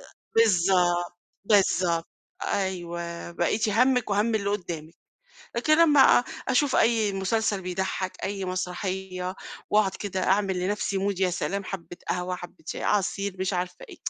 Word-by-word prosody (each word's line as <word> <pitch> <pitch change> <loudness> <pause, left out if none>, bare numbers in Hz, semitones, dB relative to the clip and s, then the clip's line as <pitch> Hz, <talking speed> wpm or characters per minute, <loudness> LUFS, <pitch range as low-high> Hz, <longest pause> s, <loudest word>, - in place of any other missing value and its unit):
أ - - -52
بالضبط 175 -4 +3 0.3
بالضبط. 185 -5 +3 0.4
أيوه، 170 -3 -3
بقيتِ 190 +6 0
هَمِّك 250 +1 +2
وهَم 215 +3 +2
اللي 200 -2 0
قدامِك، 170 -5 -4 0.6
لكن 310 +6 +3
لمّا 300 -4 +6 0.5
أشوف 260 +2 +2
أي 220 -3 +3
مسلسل 200 +1 0
بيضحك، 185 +1 -2
أي 195 0 -3
مسرحية، 185 0 -3 0.4
واقعد 210 -2 +4
كده 190 -2 -3
أعمل 190 -1 +2
لنفسي 200 +1 -1
mood 195 -1 -1
يا 185 - +3
سلام 195 +3 -2
حبّة 175 -2 -7
قهوة، 180 0 -1
حبّة 175 +1 -12
شاي، - - -5
عصير، 200 -1 0
مش 190 +1 -1
عارفة 180 0 -3
إيه - - -11
190 Hz, 135 wpm, -26 LUFS, 180-205 Hz, 0.6 s, لمّا